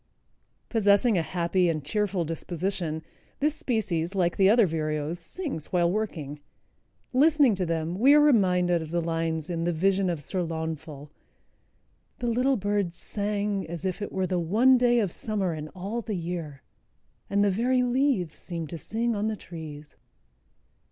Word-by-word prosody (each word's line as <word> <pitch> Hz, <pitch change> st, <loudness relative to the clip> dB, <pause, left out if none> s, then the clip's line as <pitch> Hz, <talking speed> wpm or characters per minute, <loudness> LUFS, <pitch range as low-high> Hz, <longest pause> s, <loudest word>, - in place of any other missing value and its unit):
Possessing 210 Hz, 0 st, +3 dB
a 175 Hz, -, +2 dB
happy 175 Hz, +2 st, +1 dB
and 155 Hz, -3 st, -2 dB
cheerful 195 Hz, +1 st, 0 dB
disposition, 165 Hz, 0 st, -3 dB, 0.4 s
this 300 Hz, +1 st, +2 dB
species, 195 Hz, -, -1 dB
like 175 Hz, -3 st, +1 dB
the 195 Hz, 0 st, +5 dB
other 225 Hz, 0 st, +6 dB
vireos, 155 Hz, 0 st, -2 dB
sings 175 Hz, -, -5 dB
while 175 Hz, -1 st, +2 dB
working. 160 Hz, -9 st, -3 dB, 0.7 s
Listening 290 Hz, -2 st, +5 dB
to 185 Hz, -2 st, -2 dB
them, 165 Hz, +2 st, -2 dB
we 275 Hz, +5 st, +7 dB
are -, -, +7 dB
reminded 180 Hz, -, +3 dB
of 160 Hz, -, -7 dB
the 170 Hz, +1 st, 0 dB
lines 165 Hz, -1 st, -2 dB
in 170 Hz, -2 st, -2 dB
"The 175 Hz, -, +1 dB
Vision 190 Hz, +3 st, +1 dB
of 165 Hz, -4 st, -3 dB
Sir 185 Hz, +5 st, -1 dB
Launfal"— 160 Hz, -3 st, -5 dB, 1.1 s
"The -, -, -4 dB
little 255 Hz, +3 st, +2 dB
birds 200 Hz, -3 st, -1 dB
sang 205 Hz, -1 st, -2 dB
as 170 Hz, +1 st, -6 dB
if 185 Hz, +2 st, -2 dB
it 205 Hz, -, -4 dB
were 190 Hz, 0 st, -1 dB
The 185 Hz, -1 st, 0 dB
one 220 Hz, +10 st, +4 dB
day 240 Hz, -1 st, +4 dB
of 200 Hz, -6 st, 0 dB
summer 200 Hz, -4 st, -2 dB
in 155 Hz, -1 st, -6 dB
all 195 Hz, +8 st, -5 dB
the 220 Hz, -2 st, -4 dB
year, 165 Hz, -5 st, -5 dB, 0.7 s
And 200 Hz, 0 st, +2 dB
the 205 Hz, -, +3 dB
very 250 Hz, +5 st, +2 dB
leaves 250 Hz, -, +1 dB
seemed 165 Hz, -4 st, -5 dB
to 170 Hz, -, -5 dB
sing 230 Hz, +5 st, -1 dB
on 210 Hz, +1 st, -1 dB
the 220 Hz, -, -1 dB
trees." 155 Hz, -5 st, -10 dB
185 Hz, 165 wpm, -27 LUFS, 165-215 Hz, 1.1 s, we